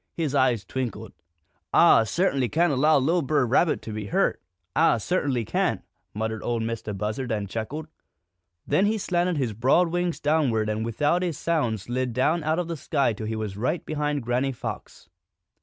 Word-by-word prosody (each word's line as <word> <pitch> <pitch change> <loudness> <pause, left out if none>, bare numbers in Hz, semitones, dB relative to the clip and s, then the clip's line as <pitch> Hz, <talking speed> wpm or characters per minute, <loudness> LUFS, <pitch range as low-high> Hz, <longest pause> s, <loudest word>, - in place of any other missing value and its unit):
His 155 -5 -2
eyes 125 -7 +2
twinkled. 115 -2 -5 0.6
"Ah 110 - +6
cert'nly 135 - +1
can't 165 0 +2
allow 150 +4 +4
li'l' 165 +6 +2
Brer 145 -2 +1
Rabbit 145 +7 +2
to 110 - -6
be 105 -1 -5
hurt, - - +1 0.3
Ah - - +4
cert'nly 130 - -1
can't!" - - 0 0.3
muttered 110 0 -3
Ol' 120 -1 -1
Mistah 110 -2 -4
Buzzard, 105 +5 -3
and 105 -2 -2
chuckled. 115 +10 -5 0.8
Then 170 +8 +2
he 220 +1 +1
slanted 180 -3 0
his 125 -6 -1
broad 135 - +3
wings 175 0 -1
downward 135 -8 +1
and 110 +1 -1
without 145 +10 +1
a 175 - 0
sound 145 - -1
slid 125 +2 -2
down 155 +7 +1
out 155 +1 +1
of 180 -2 -1
the 165 -1 -4
sky 135 -3 0
till 110 0 -6
he 110 - -2
was 110 -3 -4
right 125 - -2
behind 150 -2 -2
Granny 125 +3 0
Fox. 120 - -7
130 Hz, 175 wpm, -25 LUFS, 110-155 Hz, 0.8 s, Ah